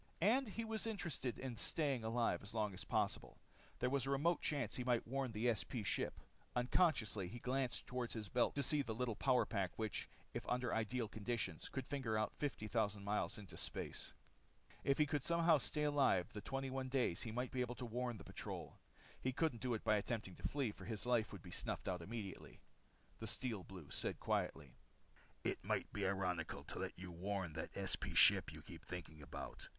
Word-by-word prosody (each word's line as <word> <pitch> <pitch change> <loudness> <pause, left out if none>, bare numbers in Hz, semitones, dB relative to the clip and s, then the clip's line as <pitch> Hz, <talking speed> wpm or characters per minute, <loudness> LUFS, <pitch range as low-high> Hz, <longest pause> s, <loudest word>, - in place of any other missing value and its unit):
And 235 +6 +4
he 225 +3 -3
was 220 0 0
interested 170 - -2
in 130 -3 -4
staying 140 -1 +1
alive 115 +1 +2
as 100 +3 -7
long 105 -2 +1
as 95 - -4
possible. - - 0 0.4
There 125 - +1
was 135 -2 +2
a - - 0
remote 150 +5 +3
chance 140 -8 0
he 125 - -1
might 120 -2 +2
warn 130 +1 -1
the 115 +2 +3
SP 110 +1 -3
ship. - - 0 0.4
Unconsciously, 120 - +3
he 115 - -6
glanced 130 +1 0
toward 125 -1 -2
his 110 -3 -3
belt 120 +5 +2
to 140 - +1
see 150 +2 +3
the 115 -5 -3
little 120 -1 0
power 130 +1 +4
pack 100 -4 0
which, 110 -2 -2 0.2
if - - -2
under 125 -1 +1
ideal 115 +1 0
conditions, 110 +2 -2
could 135 -2 -3
finger 130 -6 0
out 110 - +1
fifty 135 -7 -1
thousand 105 -1 +1
miles 105 +3 0
into 95 -5 -9
space. - - -3 0.7
If 140 - +3
he 150 - +5
could 145 -2 0
somehow 170 -2 +5
stay 130 +6 0
alive 140 -11 +3
the 105 - -4
21 135 +1 -2
days 125 -10 +2
he 115 - -2
might 125 +2 -1
be 130 - 0
able 125 0 -1
to 125 - -4
warn 120 0 -2
the 95 - -9
patrol. - - -6 0.4
He 130 - +1
couldn't 130 -4 +1
do 125 -2 +1
it 110 - -4
by 110 - +5
attempting 105 -3 -2
to - - -1
flee, 140 -6 0
for 95 - -11
his 110 +1 -2
life 120 -3 +3
would 100 -4 -8
be 90 - -9
snuffed - - -2
out 90 -2 0
immediately. 100 +1 -6 0.6
The 110 - -4
Steel 110 -4 -1
Blue 90 -8 -10
said - - 0
quietly: - - 0 0.7
"It - - 0
might - - 0
be 100 -2 +1
ironical 90 -4 -1
to - - -5
let - - -3
you 90 0 -6
warn 95 -1 -2
that - - -4
SP - - +1
ship - - +8
you - - -9
keep - - -10
thinking 80 -4 -6
about. 70 - -6
120 Hz, 200 wpm, -40 LUFS, 105-135 Hz, 0.7 s, ship